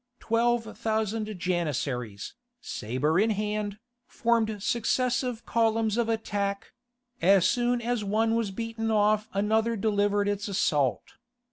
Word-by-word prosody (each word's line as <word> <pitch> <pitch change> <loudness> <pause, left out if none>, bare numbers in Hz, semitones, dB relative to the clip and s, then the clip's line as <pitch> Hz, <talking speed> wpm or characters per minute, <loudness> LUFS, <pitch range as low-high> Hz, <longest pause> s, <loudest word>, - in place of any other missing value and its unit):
Twelve 230 0 0
thousand 215 -1 -1
Janissaries, 140 - -2 0.3
sabre 130 - -1
in 220 +2 +3
hand, 210 -1 -2 0.3
formed 220 -3 0
successive 245 +1 0
columns 225 -2 +1
of 235 -1 0
attack; 200 -3 -2 0.5
as 190 +1 +5
soon 245 -2 +1
as 240 -2 -1
one 220 +3 +1
was 230 -3 0
beaten 225 +2 -4
off 215 0 +2
another 220 +3 +1
delivered 205 -1 +1
its 205 0 -1
assault. 150 -9 0
215 Hz, 115 wpm, -27 LUFS, 200-225 Hz, 0.5 s, as